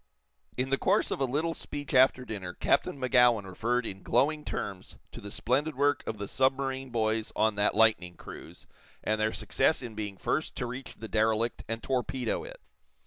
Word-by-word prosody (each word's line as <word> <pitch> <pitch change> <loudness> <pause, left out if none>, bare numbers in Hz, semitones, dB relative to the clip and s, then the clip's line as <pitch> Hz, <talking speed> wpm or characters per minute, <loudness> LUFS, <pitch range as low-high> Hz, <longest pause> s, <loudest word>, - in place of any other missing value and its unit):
In 130 +1 -1
the 135 - +2
course - - +2
of - - -2
a - - +4
little 155 +6 -1
speech 145 -3 -6
after 130 -1 +5
dinner 95 -6 -6
Captain 140 - +1
Magowan 125 -4 +4
referred 115 +6 -1
in 95 -2 -5
glowing 150 +8 +1
terms 95 -9 -5
to - - -9
the 100 - -7
splendid 135 +9 0
work 145 +1 +2
of 110 - -3
the 100 0 -5
submarine 135 +1 0
boys 110 -2 0
on 110 0 +3
that 105 0 +1
Lightning 105 -6 +3
Cruise, - - -11 0.4
and 110 0 0
their 110 0 +2
success 155 - +1
in 120 -2 -6
being 105 -2 -5
first 155 - -1
to 125 - -2
reach 125 +1 -7
the 110 - -8
derelict 110 +2 +1
and 115 +1 -4
torpedo 130 - -1
it. - - -9
120 Hz, 185 wpm, -29 LUFS, 110-135 Hz, 0.4 s, after